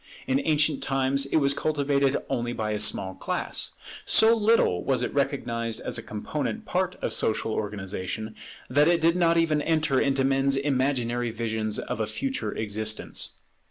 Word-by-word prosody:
In 135 +1 +1
ancient 150 -2 +1
times 135 +1 +1
it - - -2
was 140 -2 +3
cultivated 140 -2 +1
only 120 0 -2
by 110 -2 -2
a 105 - -1
small 95 -2 +2
class. - - -3 0.3
So 225 +1 +5
little 215 - +2
was 135 -2 0
it - - -3
recognized 120 -5 -1
as - - -3
a - - -5
component 145 - -4
part 185 -1 -1
of - - 0
social 110 0 0
organization, 105 +1 -4 0.3
that 145 +4 +3
it 170 0 +3
did 165 +1 +3
not 170 -2 +3
even 160 -3 +2
enter 155 -4 +1
into 135 -1 +2
men's 135 0 +2
imaginary 130 -3 0
visions 110 -1 -2
of - - -4
a 110 - -1
future 110 0 -2
existence. 110 0 -2
135 Hz, 160 wpm, -26 LUFS, 110-150 Hz, 0.3 s, So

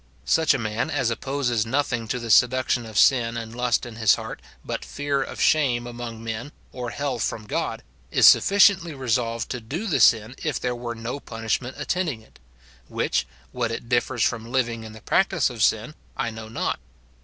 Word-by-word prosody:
Such 160 -3 +3
a - - +1
man 110 +4 -2
as 135 -6 0
opposes 120 -2 -1
nothing 125 -1 -1
to 125 - -1
the 115 -2 -3
seduction 125 0 +3
of 110 -2 -6
sin 120 -2 +4
and 115 0 -6
lust 125 -1 +1
in 115 -2 -9
his 110 -3 +5
heart - - -7 0.2
but - - -4
fear 145 -1 -2
of - - -5
shame 130 -6 +3
among 120 -2 -7
men 115 +5 -5 0.2
or 125 -2 -5
hell 140 -2 -3
from 110 -1 -2
God, - - -3 0.3
is - - +4
sufficiently 195 -5 +5
resolved 115 -3 -1
to 125 - -4
do 150 - -4
the 190 - +1
sin 110 +1 +4
if 155 -5 -1
there 125 -1 -1
were 120 -1 -5
no 115 +5 -5
punishment 115 +2 -3
attending 160 -12 -2
it; - - -23 0.5
which, - - -1 0.2
what 120 -2 -1
it 115 +1 -6
differs 120 0 +1
from 115 0 -1
living 120 -3 0
in 110 -1 -9
the 110 - -12
practice 175 -8 +2
of 115 -3 -7
sin, 110 +6 +2 0.2
I 115 - -1
know 110 0 -9
not. 115 - -2
120 Hz, 190 wpm, -24 LUFS, 115-135 Hz, 0.5 s, his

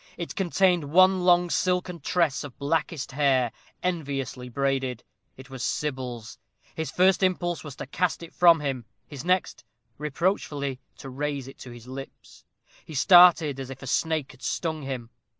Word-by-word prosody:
It 170 - -5
contained 180 -3 +2
one 185 +2 +6
long 175 -1 +4
silken 180 +1 0
tress 160 -1 0
of 140 -4 -10
blackest 155 0 -2
hair 130 -4 +2 0.3
enviously 140 -7 -3
braided. 135 -1 -1 0.3
It 130 +1 -13
was 130 -2 -7
Sybil's. 130 -6 -4 0.3
His 160 -1 -4
first 185 +2 +3
impulse 175 -2 0
was 145 -4 -8
to - - -7
cast 170 +5 -1
it 165 - -11
from 170 -3 +5
him; 135 -5 -3 0.2
his 145 -3 -8
next, 180 +1 0 0.4
reproachfully 150 -3 -2 0.2
to 135 - -9
raise 140 0 -3
it 135 - -12
to 125 - -10
his 120 -1 -11
lips. 135 +1 -10 0.4
He 155 - -10
started 165 -3 +6
as 135 -1 -6
if 135 0 -9
a - - -6
snake 155 +2 -1
had 130 - -19
stung 160 +6 -2
him. 130 -4 -6
145 Hz, 160 wpm, -26 LUFS, 135-175 Hz, 0.4 s, one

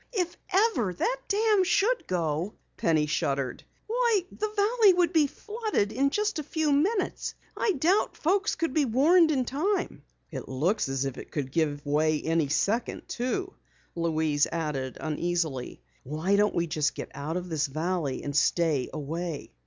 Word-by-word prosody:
"If 360 -5 -1 0.2
ever 375 - +2
that - - 0
dam 425 -1 +3
should 370 +3 +3
let - - -25
go 170 +1 -1
" - - -44
Penny 155 -2 +2
shuddered, 140 -3 -1 0.2
"why, 465 -2 +2
the 430 - -3
valley 425 0 +4
would 350 -1 +2
be 310 -3 +4
flooded 425 - -2
in 270 +5 +2
just 420 +2 -1
a - - -3
few 310 +1 0
minutes. 370 +8 0 0.2
I 425 - +1
doubt 350 +7 +1
folks 390 +6 +1
could 330 -5 -2
be 300 -3 +3
warned 315 +8 +5
in 265 -5 +1
time." 340 - -1 0.3
"It - - -6
looks 160 +7 0
as 135 0 -1
if 135 -1 -4
it - - -10
could 135 -3 -4
give 145 -2 0
way 150 +1 +2
any 160 -2 0
second 215 - 0
too," 360 +11 -2 0.4
Louise 160 -3 +1
added 150 -6 -3
uneasily. 160 -4 -2 0.2
"Why 155 +8 0
don't 210 +1 +2
we 170 - +1
get 155 -4 -2
out 155 +4 -3
of 180 0 -5
this 160 -3 0
valley 155 -1 -2
and 145 -1 -4
stay 155 -3 +2
away?" 160 +1 -5
185 Hz, 165 wpm, -27 LUFS, -, 0.4 s, warned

